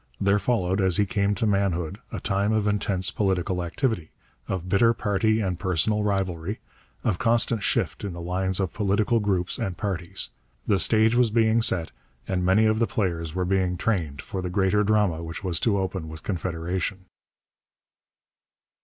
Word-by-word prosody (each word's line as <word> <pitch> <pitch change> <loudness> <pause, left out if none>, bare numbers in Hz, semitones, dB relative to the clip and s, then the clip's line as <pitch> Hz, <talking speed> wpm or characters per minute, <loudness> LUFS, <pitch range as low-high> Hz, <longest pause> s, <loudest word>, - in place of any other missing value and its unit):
There 100 +1 +3
followed, 95 -3 0
as 95 -3 +3
he 105 - +3
came 100 +1 0
to 105 - -1
manhood, 100 -3 0
a - - -4
time 100 0 0
of 110 -1 +1
intense 100 -3 +1
political 95 -2 0
activity, 90 - -2 0.4
of 95 -2 -3
bitter 115 +5 +3
party 110 +1 +1
and 90 -3 -2
personal 95 +4 +1
rivalry, 95 -2 -2 0.4
of 90 - 0
constant 115 -1 +2
shift - - -1
in 100 - -3
the 85 - -8
lines 95 +2 -1
of 95 -4 -1
political 105 +3 +1
groups 95 -4 -1
and 90 -3 -3
parties. 90 -4 -1 0.4
The 100 -2 +2
stage 110 +5 +3
was 120 -1 +3
being 110 +1 +3
set 90 -7 +2 0.4
and 90 -1 -1
many 95 +5 +4
of 110 0 +2
the 115 - +2
players 85 -5 -2
were 90 -1 0
being 90 -1 0
trained 85 -9 -1
for 95 - -5
the 90 - -3
greater 95 +2 +2
drama 105 -6 +1
which 80 +3 -7
was 90 -4 -1
to 105 -4 +1
open 95 -4 -3
with 80 0 -8
Confederation. 90 +1 -3
95 Hz, 170 wpm, -25 LUFS, 90-105 Hz, 0.4 s, many